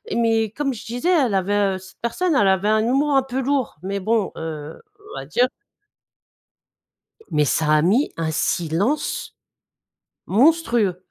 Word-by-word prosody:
mais, 225 -2 +1
comme 275 +1 -2
je - - -10
disais, 245 +10 -2
elle 275 - +3
avait 195 +1 0 0.2
heu - - -4
cette 190 0 -16
personne, 310 +8 0
elle 205 -6 +4
avait 190 +2 +2
un 215 0 +3
humour 275 +5 +1
un 270 - +4
peu 265 0 -3
lourd 270 - -1
mais 195 +1 -3
bon, 220 +1 0
heu, 155 -1 -6 0.4
on - - -4
va 135 - -8
dire 240 - +2 1.8
Mais 150 -1 +2
ça 155 +2 +1
a 150 - +4
mis 220 - +2
un 160 -1 -1
silence 170 - -1 0.9
monstrueux, 235 - +2
220 Hz, 155 wpm, -21 LUFS, 180-265 Hz, 1.8 s, elle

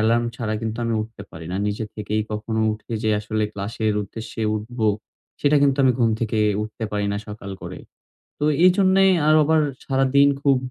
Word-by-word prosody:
Alarm 115 +2 +2
ছাড়া 110 -2 -2
কিন্তু 115 +1 -4
আমি 115 - 0
উঠতে 110 -2 -10
পারি 80 0 -9
না। 95 - -1
নিজে 105 +2 -2
থেকেই 105 0 -2
কখনো 110 +1 -2
উঠে 110 +2 -9
যে 110 - +1
আসলে 110 0 -2
ক্লাসের 105 +2 -2
উদ্দেশ্যে 110 +2 -7
উঠব। 115 +4 -8 0.6
সেটা 145 +1 +3
কিন্তু 140 -2 +3
আমি 130 -1 +5
ঘুম 115 -2 +3
থেকে 110 -1 -1 0.2
উঠতে 110 +1 -6
পারি 105 -1 -1
না, - - -1
সকাল 105 -1 -8
করে। - - -7 0.6
তো 150 - -2 0.2
এইজন্যেই 190 +1 +5 0.2
আর 155 - +6
আবার 160 +1 +3 0.2
সারাদিন 135 +1 +3
খুব 140 -2 +4
115 Hz, 180 wpm, -22 LUFS, 105-135 Hz, 0.6 s, আর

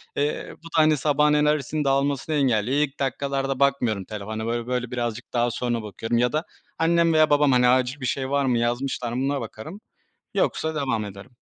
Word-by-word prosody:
Eee, 145 +1 -1
bu - - -37
da, - - -10
hani, 155 -1 +5
sabahın 150 +1 +2
enerjisinin 150 0 +1
dağılmasını 140 +2 0
engelliyor. 130 -2 +1
İlk 150 -1 -1
dakikalarda 135 0 -2
bakmıyorum 125 -8 +1
telefona. 110 +1 -5
Böyle, 120 +1 -2
böyle 125 -1 -2
birazcık 120 -1 -4
daha 120 0 +1
sonra 120 0 -2
bakıyorum 115 +3 -3
ya 125 +1 +2
da 155 +1 -1 0.3
annem 165 0 +3
veya 155 -1 +4
babam, 145 -1 +4
hani, 125 -1 +4
acil 130 +2 +2
bir - - -3
şey 130 +1 -2
var 140 0 +1
mı 125 -2 +2
yazmışlar 120 +1 -1
mı 125 - -1
buna 140 0 -1
bakarım. 115 - -8 0.5
Yoksa 160 0 0
devam 130 -7 -1
ederim. 100 +4 -10
130 Hz, 190 wpm, -24 LUFS, 120-145 Hz, 0.5 s, hani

